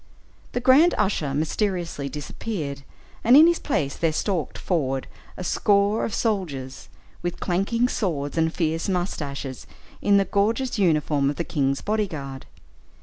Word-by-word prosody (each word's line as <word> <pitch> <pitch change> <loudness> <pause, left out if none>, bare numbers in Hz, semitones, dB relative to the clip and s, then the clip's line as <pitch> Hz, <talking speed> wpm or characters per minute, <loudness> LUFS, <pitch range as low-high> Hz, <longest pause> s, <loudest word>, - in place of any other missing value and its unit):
The 245 - 0
grand 265 +8 +5
usher 150 -8 0
mysteriously 170 -2 -1
disappeared, 145 - -5 0.4
and 245 +4 +7
in 310 - +9
his 340 0 +3
place 145 - -1
there 165 -1 +1
stalked 165 -2 -2
forward 135 -7 -1 0.3
a 185 - -5
score 200 +3 +2
of 220 - -2
soldiers, 150 - -2 0.3
with 175 0 -3
clanking 200 +7 +1
swords 155 - -2
and 160 -1 +2
fierce 165 +1 -1
moustaches, 145 -7 -3 0.3
in 200 -1 +4
the 195 - +3
gorgeous 225 +5 0
uniform 150 -6 +2
of 145 - -2
the 170 - -2
king's 140 -4 0
body 215 0 0
guard. 140 -6 -7
175 Hz, 145 wpm, -24 LUFS, 145-205 Hz, 0.4 s, in